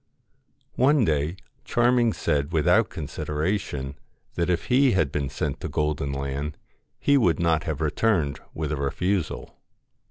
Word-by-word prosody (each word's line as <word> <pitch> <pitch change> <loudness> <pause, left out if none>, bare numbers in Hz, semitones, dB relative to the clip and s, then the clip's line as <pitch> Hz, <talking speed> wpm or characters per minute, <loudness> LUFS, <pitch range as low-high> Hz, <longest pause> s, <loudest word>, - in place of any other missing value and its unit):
One 135 -1 +4
day 75 +2 0 0.3
Charming 120 -1 +3
said 70 +1 -1
without 80 -2 +3
consideration, 75 -1 -3 0.4
that 85 +1 -1
if 85 -2 0
he 130 +1 +4
had 80 -8 +1
been 70 -2 -2
sent 65 - -3
to - - -5
Golden 75 -2 -1
Land, 70 +2 -3 0.4
he 140 0 +3
would 90 -9 +2
not 80 -2 +2
have 80 -2 -3
returned 80 -1 +1
with 75 -1 -3
a 75 - -1
refusal. 90 +6 -2
80 Hz, 135 wpm, -25 LUFS, 70-100 Hz, 0.4 s, One